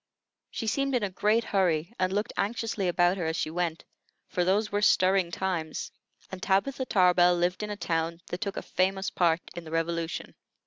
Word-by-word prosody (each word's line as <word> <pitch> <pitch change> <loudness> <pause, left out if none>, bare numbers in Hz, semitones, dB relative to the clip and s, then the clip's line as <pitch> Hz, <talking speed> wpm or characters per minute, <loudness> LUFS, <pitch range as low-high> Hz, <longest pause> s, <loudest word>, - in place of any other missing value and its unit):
She - - -5
seemed 275 +4 0
in 240 - +1
a 200 - -1
great 210 +5 +2
hurry, 175 -2 0
and 185 0 +1
looked 205 +2 -1
anxiously 215 -2 -1
about 175 +1 +3
her 175 - -2
as 160 - -1
she 155 - -2
went; 170 -1 -2 0.4
for 180 - 0
those 205 +4 +1
were 205 0 0
stirring 190 -3 +4
times, 170 -3 -3 0.4
and 190 -1 -7
Tabitha 255 +8 0
Tarbell 180 -2 +5
lived 175 +2 0
in 210 - -4
a 205 - -4
town 165 -2 -1
that 180 - -5
took 200 -3 -3
a - - -3
famous 190 +1 0
part 170 -1 +2
in 175 - -6
the 160 - -10
Revolution. 165 0 -2
185 Hz, 190 wpm, -28 LUFS, 170-205 Hz, 0.4 s, Tarbell